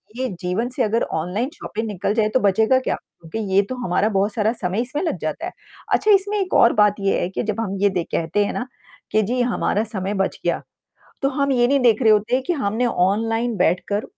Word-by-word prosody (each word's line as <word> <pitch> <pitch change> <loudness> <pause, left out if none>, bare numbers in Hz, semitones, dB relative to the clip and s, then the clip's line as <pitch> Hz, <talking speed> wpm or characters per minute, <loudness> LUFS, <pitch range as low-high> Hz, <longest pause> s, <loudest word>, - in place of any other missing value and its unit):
ये 260 +1 -1
जीवन 190 +7 -1
से - - +1
अगर 225 +2 +1 0.2
ऑनलाइन 210 - -2
शॉपिंग 220 -7 -5
निकल 205 0 -2
जाए, 215 -1 +2
तो 260 - +2
बचेगा 220 +5 +3
क्या? - - -1
क्योंकि 165 +6 -10 0.2
ये 200 - +7
तो 255 - -3
हमारा 195 +4 +1
बहुत 200 +1 0
सारा 220 0 +1
समय 185 +5 0
इसमें 260 +6 -3
लग 320 - -1
जाता 155 - -3
है। 365 - -5 0.4
अच्छा, 425 - +3
इसमें 405 +1 +3
एक 375 -2 -2
और 235 - +6
बात 210 -1 +4
ये 195 0 +1
है 175 - -1
कि 195 - -3
जब 215 0 -3
हम 195 -3 -3
ये 205 - +4
दे 180 -3 -1
कहते 170 +5 0
हैं - - -3
ना, 255 - -4 0.4
कि 215 - +3
जी 245 +4 -1
हमारा 235 -3 0
समय 200 -2 -3
बच 195 -1 -1
गया। - - 0 0.6
तो 275 - +3
हम 280 0 0
ये 240 -1 +3
नहीं 280 0 +3
देख 235 -1 +4
रहे 220 - +5
होते 215 +4 +2
हैं 260 - +1
कि 355 - 0
हमने 240 -4 0
ऑनलाइन 225 +4 0
बैठकर 185 +4 0
220 Hz, 235 wpm, -21 LUFS, 195-250 Hz, 0.6 s, ये